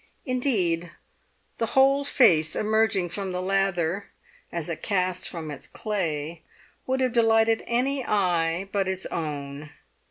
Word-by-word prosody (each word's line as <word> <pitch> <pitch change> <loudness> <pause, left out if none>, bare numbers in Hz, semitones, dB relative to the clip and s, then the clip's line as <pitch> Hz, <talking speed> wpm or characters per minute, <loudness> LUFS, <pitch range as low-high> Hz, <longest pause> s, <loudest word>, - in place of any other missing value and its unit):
Indeed, 195 -11 +1 0.7
the 230 - 0
whole 275 +1 +5
face 165 - +4
emerging 215 -4 +1
from 195 +2 -4
the 180 - -2
lather, 195 -1 0 0.4
as 170 -3 -4
a 170 - -2
cast 185 -1 -1
from 160 -4 -6
its 140 - -9
clay, 165 -6 -3 0.5
would 260 0 0
have 255 -2 +1
delighted 225 -1 +3
any 260 +3 +1
eye 180 -4 +1
but 195 -2 0
its 190 0 -2
own. 145 -2 -5
190 Hz, 130 wpm, -26 LUFS, 165-225 Hz, 0.7 s, whole